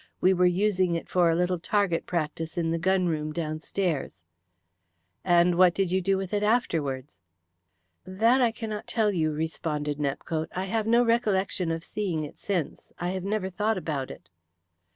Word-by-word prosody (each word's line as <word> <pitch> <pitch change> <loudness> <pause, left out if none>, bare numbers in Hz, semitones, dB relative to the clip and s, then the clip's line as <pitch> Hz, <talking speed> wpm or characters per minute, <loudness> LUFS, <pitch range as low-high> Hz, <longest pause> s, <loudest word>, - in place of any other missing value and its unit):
We 185 - +4
were 180 0 +4
using 185 -1 +2
it 165 - -4
for 175 -2 +3
a 165 - +2
little 180 +1 0
target 190 -2 0
practice 165 -1 -3
in 165 -1 0
the 165 - 0
gun 190 +1 +2
room 155 -2 -1
downstairs." 155 - -3 1.0
"And 175 -1 +4
what 180 -2 +6
did 195 -3 0
you 190 +1 +2
do 195 +1 +1
with 190 +1 -4
it 205 - +1
afterwards?" 150 - 0 0.9
"That 225 +8 +2
I 240 -2 +4
cannot 220 -2 -6
tell 220 -3 +1
you," 160 -5 0
responded 150 -1 -3
Nepcote. 155 +3 -2
"I 185 +1 -1
have 220 +2 -1
no 235 +2 +5
recollection 200 -6 +1
of 165 0 -2
seeing 180 -7 -2
it 150 - -8
since. 180 -7 -3
I 175 - -2
have 185 0 -3
never 200 -1 -2
thought 210 +3 0
about 145 -7 -3
it." - - -11
180 Hz, 170 wpm, -27 LUFS, 160-200 Hz, 1.0 s, what